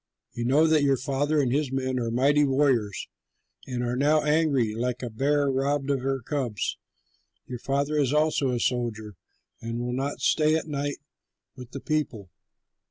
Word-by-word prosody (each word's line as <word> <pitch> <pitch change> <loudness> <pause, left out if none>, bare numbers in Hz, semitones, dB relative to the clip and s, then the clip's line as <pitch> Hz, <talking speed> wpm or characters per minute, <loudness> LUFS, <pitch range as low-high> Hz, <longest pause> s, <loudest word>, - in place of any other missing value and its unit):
You 120 - -3
know 145 +6 +4
that 160 -2 +4
your 140 -2 +3
father 145 +3 0
and 130 -4 +1
his 140 0 0
men 130 -1 -1
are 115 -1 -2
mighty 140 +5 +3
warriors 130 -7 +1 0.6
and 125 -2 -3
are 120 0 -1
now 150 +3 +3
angry, 150 -7 +2
like 125 +2 -2
a 120 - -4
bear 145 +5 +1
robbed 140 +1 0
of 140 - +1
her 135 0 -1
cubs. 120 -5 -3 0.7
Your 125 -1 -6
father 140 +4 0
is 135 -3 +2
also 150 -2 +2
a 125 -1 -1
soldier 115 -4 -2 0.5
and 115 0 -4
will 120 0 -3
not 135 +3 -2
stay 155 0 +3
at 160 - -1
night 145 -2 -3 0.6
with 125 -2 -10
the 135 - -7
people. 125 - -3
135 Hz, 170 wpm, -26 LUFS, 125-145 Hz, 0.7 s, know